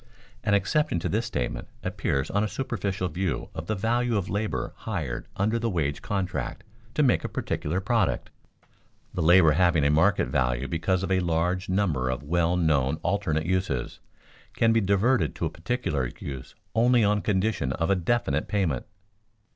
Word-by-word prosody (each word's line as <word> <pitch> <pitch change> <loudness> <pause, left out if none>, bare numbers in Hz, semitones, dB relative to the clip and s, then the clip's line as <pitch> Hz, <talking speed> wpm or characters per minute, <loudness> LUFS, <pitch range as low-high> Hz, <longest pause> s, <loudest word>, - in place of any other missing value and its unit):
An 105 -1 +3
exception 150 - +1
to - - -2
this - - 0
statement - - -3 0.2
appears 70 - -1
on 100 +1 +1
a - - +1
superficial 100 -6 -2
view 85 -4 -2
of 80 +1 -6
the 110 - 0
value 115 +3 +1
of 95 -3 -3
labor 105 +2 -2
hired - - -4
under 110 +4 +1
the 115 0 0
wage 75 -7 -1
contract 95 -3 -3 0.3
to 150 - +3
make 125 - +3
a - - -3
particular 85 +5 -2
product. 95 - 0 0.8
The - - -2
labor 80 0 +6
having 85 -1 +3
a 70 - +4
market 80 +7 +3
value 60 -2 0
because 90 +3 0
of 95 - -2
a 95 - +3
large 90 +2 0
number 85 -10 +1
of 65 +2 -3
well 85 +3 +1
known 75 -5 +2
alternate 85 -5 0
uses, 90 -9 -1 0.6
can 115 0 +3
be 115 - +3
diverted 100 +6 +2
to - - -2
a - - -2
particular 85 - -2
use 65 -2 -7 0.2
only 120 +1 +4
on 105 0 +2
condition 100 -9 0
of 85 +5 0
a - - +4
definite 85 -6 0
payment. 85 -12 -1
90 Hz, 170 wpm, -26 LUFS, 80-105 Hz, 0.8 s, labor